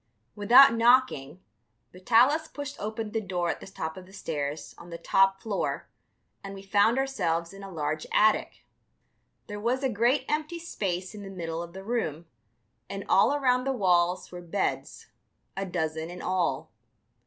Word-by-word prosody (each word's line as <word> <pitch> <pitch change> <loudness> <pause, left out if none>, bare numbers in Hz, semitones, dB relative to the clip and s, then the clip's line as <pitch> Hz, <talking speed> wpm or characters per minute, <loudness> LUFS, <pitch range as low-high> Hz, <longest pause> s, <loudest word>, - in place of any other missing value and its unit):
Without 235 +5 +7
knocking, 230 - +2 0.5
Vitalis 245 - +3
pushed 285 -1 -7
open 215 0 -4
the 225 - -1
door 180 -4 -1
at - - -6
the - - -11
top 160 -4 -6
of 185 -1 -11
the 190 - -17
stairs, 150 -5 -4
on 175 - -12
the 170 - -6
top 195 +3 +3
floor, 210 -3 -2 0.6
and 195 0 -7
we 195 - -10
found 205 +4 +3
ourselves 175 -11 -1
in 195 - -11
a 195 - -8
large 155 -3 -3
attic. 215 0 +2 0.8
There 205 -1 -7
was 245 +5 -1
a 265 - +2
great 240 +5 +1
empty 305 +3 -2
space 190 - -4
in 210 - -9
the 195 - -8
middle 165 -3 -5
of 170 0 -9
the 190 +1 -9
room, 185 -8 -2 0.6
and - - -6
all 285 - +4
around 255 -3 +2
the 270 - 0
walls 180 -5 +1
were 180 0 -8
beds, 175 +3 -3 0.5
a 195 0 -3
dozen 160 -2 -3
in 180 +1 -8
all. 175 -7 -1
195 Hz, 165 wpm, -27 LUFS, 175-235 Hz, 0.8 s, Without